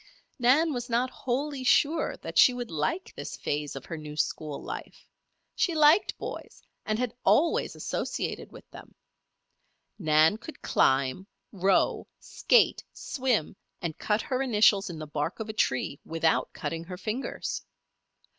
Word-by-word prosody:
Nan 285 +6 +4
was 245 0 -4
not 245 +2 +1
wholly 270 +2 -3
sure 300 +5 +2
that - - -6
she 250 - +7
would 245 -4 -5
like 240 - -2
this - - -7
phase 145 -1 -3
of 135 - -7
her 165 - -6
new 150 -1 -8
school 150 0 -2
life. - - -8 0.5
She 345 - 0
liked 310 +5 +5
boys - - -8 0.2
and 215 0 0
had 250 -1 -2
always 330 +3 +3
associated - - -3
with - - -13
them. - - -13 1.0
Nan 155 +2 +4
could 240 +8 -11
climb, 135 +7 +2 0.2
row, 195 0 +1
skate, - - +2
swim, 250 - -1 0.2
and 165 -3 -4
cut 210 0 0
her 260 -1 -1
initials 210 -5 +4
in 170 - -6
the 155 - -6
bark 150 +4 -3
of 220 0 -5
a - - -3
tree 140 -7 0
without 165 0 0
cutting 165 0 -5
her 180 +1 -7
fingers. 220 +7 -4
215 Hz, 145 wpm, -28 LUFS, 160-260 Hz, 1.0 s, she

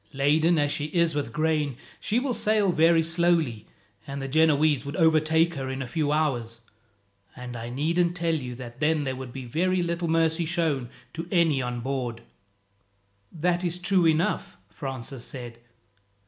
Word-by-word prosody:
Laden 155 +5 +3
as 145 -1 +2
she 150 0 -1
is 170 +1 +1
with 145 -5 -2
grain, 150 -2 0 0.2
she 220 - -1
will 255 0 0
sail 210 -4 +2
very 165 0 +4
slowly, 165 -9 +1 0.4
and 140 0 -5
the 135 - -4
Genoese 155 -1 +3
would 140 +1 -6
overtake 160 0 +3
her 135 -3 -4
in 130 0 -3
a - - -7
few 150 +2 -1
hours; 120 -7 -1 0.7
and 125 -1 -8
I 115 0 -6
needn't 170 +7 0
tell 170 -2 0
you 130 -6 -3
that 120 -1 -10
then 155 0 +2
there 130 -2 -2
would 130 -1 -7
be 130 0 -7
very 180 +8 0
little 170 0 -2
mercy 165 +1 +2
shown 155 -7 -1 0.2
to 165 +1 -5
any 165 -7 +3
on 125 -1 -3
board." 125 -3 -3 1.1
"That 175 +2 0
is 175 -1 -1
true 180 -1 +2
enough," 160 - 0
Francis 130 -1 -6
said. 120 -3 -6
155 Hz, 165 wpm, -26 LUFS, 130-170 Hz, 1.1 s, very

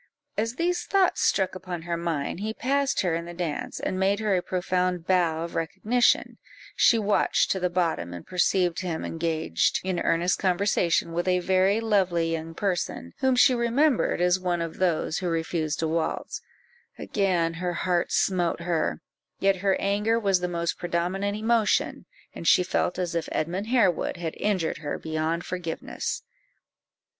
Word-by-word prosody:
As 225 +3 -1
these 350 +4 0
thoughts 390 -2 +2
struck 190 -2 +2
upon 180 -3 -6
her 170 0 -2
mind, 170 -2 -2
he 220 +2 -3
passed 280 +1 +1
her 180 -3 0
in 170 +1 -2
the 175 0 -8
dance, 170 -4 -4
and 185 - -2
made 195 +2 +2
her 210 -3 +1
a 180 - +1
profound 180 -1 -1
bow 170 -4 +2
of 170 - -6
recognition; 220 +9 +1 0.4
she 235 - +5
watched 210 -1 +2
to 190 - 0
the 180 0 0
bottom, 170 - -1
and 85 -1 -8
perceived 180 -1 +1
him 175 -4 -3
engaged 160 - 0
in 185 -1 -1
earnest 175 +2 +1
conversation 180 -3 +1
with 175 +2 -1
a 180 0 +3
very 190 +3 +2
lovely 185 -7 +1
young 165 0 -4
person, 175 - -2
whom 265 -1 +2
she 250 +1 +6
remembered 240 - +2
as 180 +1 +3
one 180 -2 -1
of 165 -1 -4
those 170 -4 +1
who 180 -2 -2
refused 160 -2 -1
to 160 - -1
waltz; 160 0 -2 0.6
again 180 -5 0
her 175 +1 -3
heart 175 0 0
smote 175 -3 +1
her, 160 - -1 0.4
yet 195 0 +2
her 195 0 +1
anger 210 +3 +1
was 195 -4 +2
the 180 - -2
most 170 -1 -2
predominant 180 +4 -1
emotion, 220 0 +1 0.3
and 170 - -6
she 180 - +6
felt 180 -1 -1
as 180 -1 -2
if 170 -1 -2
Edmund 180 +7 -2
Harewood 230 -11 +2
had 165 -2 -4
injured 190 -6 -1
her 145 -2 -4
beyond 160 +1 -2
forgiveness. 175 -3 -4
180 Hz, 165 wpm, -26 LUFS, 170-200 Hz, 0.6 s, she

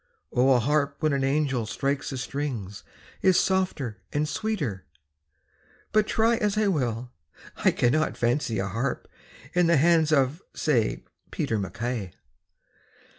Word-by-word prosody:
O 130 +2 +4
a 125 - +4
harp 140 +3 +1
when 155 -2 +2
an 135 -1 0
angel 135 -4 0
strikes 135 +3 -2
the 135 - -4
strings 125 -7 -4 0.4
Is 190 -2 +5
softer 150 - -1
and 150 +1 0
sweeter, 150 - -2 1.1
but 215 0 +3
try 225 +1 +2
As 210 -1 0
I 215 -1 +3
will, 125 - -1 0.5
I - - +3
cannot 155 +6 +1
fancy 120 -1 0
a 95 - -1
harp 115 +8 -3 0.5
In 180 -1 +3
the 170 -1 +4
hands 160 +1 +4
of, 140 +3 +2
say, 125 -8 +1 0.3
Peter 110 - -1
MacKay. 105 -1 -4
140 Hz, 135 wpm, -26 LUFS, 120-160 Hz, 1.1 s, Is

